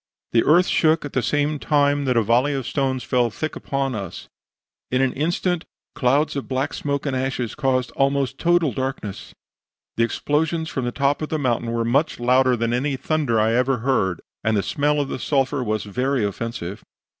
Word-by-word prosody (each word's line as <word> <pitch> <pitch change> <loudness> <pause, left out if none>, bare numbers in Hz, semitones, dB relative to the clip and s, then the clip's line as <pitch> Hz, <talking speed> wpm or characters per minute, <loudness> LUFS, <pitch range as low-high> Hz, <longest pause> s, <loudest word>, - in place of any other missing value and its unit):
The 115 - +4
earth 175 +5 +5
shook 160 -3 +2
at 145 - -7
the 130 - +1
same 145 +3 0
time 145 -1 +2
that 125 -2 +1
a 115 - +4
volley 125 +7 +2
of 135 -3 -3
stones 135 -1 -1
fell 125 -2 +1
thick 155 +8 -4
upon 135 -1 -2
us; 100 -5 -6 0.6
in 130 - +1
an 130 -1 +2
instant 175 +3 0 0.3
clouds 140 +5 +1
of 140 - -4
black 135 +2 -1
smoke 140 0 -2
and 140 -2 -1
ashes 130 -3 -2
caused 130 -3 0
almost 135 -1 +1
a - - -39
total 170 -5 +2
darkness; 130 -5 -5 0.6
the 115 - +3
explosions 160 +6 0
from 130 - -3
the 120 - -1
top 140 +3 0
of 155 - -3
the 155 - -1
mountain 120 -4 0
were 115 0 0
much 140 +6 +1
louder 125 +1 +3
than 115 +1 0
any 135 +2 0
thunder 135 -4 0
I 110 +1 +2
ever 125 +2 +2
heard, 95 -10 +1 0.2
and 110 0 +2
the 100 - +1
smell 145 +1 +1
of 145 - 0
the 130 - -4
sulphur 135 0 0
was 110 -2 -1
very 125 +3 0
offensive. 100 -2 -4
135 Hz, 195 wpm, -22 LUFS, 120-145 Hz, 0.6 s, earth